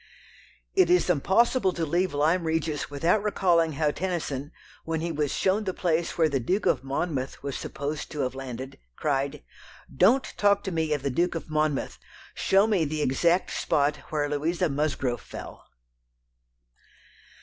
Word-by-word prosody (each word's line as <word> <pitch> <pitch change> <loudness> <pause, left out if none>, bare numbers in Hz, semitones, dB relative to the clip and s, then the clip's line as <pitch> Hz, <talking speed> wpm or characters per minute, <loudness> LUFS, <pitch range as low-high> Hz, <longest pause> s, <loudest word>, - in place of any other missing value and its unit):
It 375 -1 +4
is 360 - +4
impossible 190 - +2
to 165 - -2
leave 175 +4 +1
Lyme 165 +4 +2
Regis 160 -2 -1
without 165 +8 +1
recalling 175 -6 +2
how 150 +1 +1
Tennyson, 155 -6 -3 0.3
when 160 0 -2
he 170 +1 -2
was 150 -2 -1
shown 195 +3 +1
the 185 -3 -3
place 170 -1 0
where 165 -2 +4
the 140 -3 0
Duke 185 - -1
of 130 - +2
Monmouth 135 -1 -3
was 140 -1 -3
supposed 145 +2 -4
to 150 - -4
have 130 -1 -1
landed, 130 - -7 0.2
cried: 140 - -1 0.5
"Don't 225 - +3
talk 200 -1 +3
to 190 - -3
me 160 -2 -1
of 145 -3 -2
the 140 - 0
Duke 175 +6 +1
of 160 -1 -6
Monmouth! 155 -2 -1 0.3
Show 195 +2 +3
me 205 -6 +2
the 155 0 -1
exact 170 +7 +2
spot 145 0 +1
where 150 -2 0
Louisa 160 +5 0
Musgrove 140 -5 -1
fell!" - - -10
160 Hz, 160 wpm, -26 LUFS, 145-180 Hz, 0.5 s, It